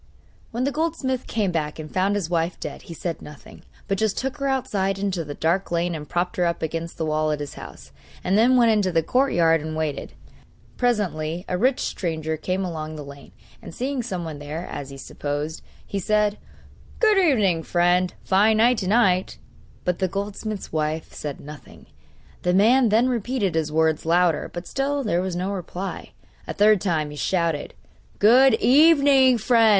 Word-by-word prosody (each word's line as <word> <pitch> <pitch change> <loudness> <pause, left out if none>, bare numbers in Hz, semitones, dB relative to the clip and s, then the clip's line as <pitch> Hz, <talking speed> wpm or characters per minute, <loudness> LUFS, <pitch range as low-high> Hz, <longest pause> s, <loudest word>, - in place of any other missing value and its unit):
When 240 +2 -3
the 280 - +1
goldsmith 300 -5 -2
came 210 -5 0
back 155 -3 -2
and 155 -1 -8
found 195 +2 +1
his 200 -5 -1
wife 170 0 -1
dead - - -6
he - - -5
said 170 +1 -4
nothing, 150 -1 -13 0.3
but 195 -2 -1
just 220 -2 0
took 270 +2 -3
her 275 -1 -2
outside 215 -8 -1
into 195 -3 -2
the 145 -1 -7
dark 170 +4 0
lane 175 0 0
and 150 -2 -7
propped 175 +1 -1
her 180 - +2
up 170 - -2
against 165 +1 -4
the 160 - -2
wall 155 0 0
of 150 - -2
his 145 -1 -6
house, - - -11 0.3
and 185 - +1
then 245 +4 +5
went 235 -2 +5
into 205 -4 +2
the 165 -1 +2
courtyard 170 - +2
and 155 +1 -5
waited. 155 -2 -3 0.6
Presently 180 -8 -1
a - - -1
rich 250 +8 +1
stranger 160 -3 -2
came 185 +4 -2
along 155 -3 -5
the 150 -2 -7
lane, 140 0 -12 0.3
and - - -10
seeing 265 +1 -2
someone 175 -10 -5
there, 150 +4 -6
as 140 -1 -6
he 135 - -9
supposed, 145 +3 -4 0.2
he 200 - -3
said: 210 +2 +1 0.6
'Good 430 -3 +4
evening, 215 - +3
friend! 175 +2 +2
a - - -25
fine 210 +3 +4
night 235 +2 +4
to 190 - -3
night!' 190 -4 +2 0.5
But 180 -1 0
the 190 - +1
goldsmith's 200 +2 -5
wife 155 0 -2
said 145 -2 -6
nothing. 150 +1 -12 0.6
The 180 0 +1
man 235 +5 +5
then 225 +4 +3
repeated 240 -5 -1
his 160 -2 -1
words 160 0 +1
louder; 170 -1 +2
but 175 0 -7
still 280 +4 -1
there 180 -6 0
was 185 -1 -3
no 185 +3 -2
reply. 190 0 -6 0.3
A - - -5
third 210 -2 +4
time 155 -6 -1
he - - -8
shouted: 165 -3 -1 0.4
'Good 250 +4 +6
evening, 275 -1 +5
friend! 230 0 +4
185 Hz, 185 wpm, -23 LUFS, 160-225 Hz, 0.6 s, Good